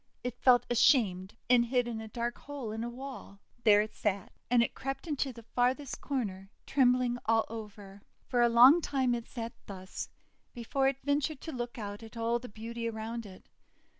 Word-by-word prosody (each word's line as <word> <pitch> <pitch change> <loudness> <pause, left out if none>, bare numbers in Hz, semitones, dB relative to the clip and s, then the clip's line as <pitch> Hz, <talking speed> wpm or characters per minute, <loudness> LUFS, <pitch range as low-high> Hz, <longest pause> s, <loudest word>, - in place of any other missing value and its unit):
It 245 0 -5
felt 245 -2 +5
ashamed, 215 - +3
and 240 -1 +5
hid 245 0 +1
in 225 -2 -4
a 220 - -7
dark 235 +2 -3
hole 280 -6 -6
in 225 +1 -4
a 240 - -3
wall. 255 -5 -9 0.3
There 210 -1 +7
it 215 - -8
sat, 200 -2 -2 0.2
and 240 -1 +5
it - - -3
crept 270 +4 -5
into 285 -4 -1
the 230 -2 -12
farthest 250 +4 -1
corner, 195 -9 -3 0.2
trembling 250 -2 +2
all 225 0 +3
over. 205 -3 -9 0.2
For 245 -2 +1
a 240 - +5
long 255 +8 +8
time 260 -5 +1
it 235 -1 -4
sat 230 -2 -6
thus, 185 -2 -7 0.5
before 265 +3 0
it 270 -1 +1
ventured 285 +1 0
to 320 - -6
look 240 -1 -5
out 205 -1 -6
at 225 +1 -11
all 230 +1 +1
the 250 - -9
beauty 230 +2 -5
around 225 0 -5
it. 185 -1 -14
235 Hz, 190 wpm, -31 LUFS, 220-255 Hz, 0.5 s, long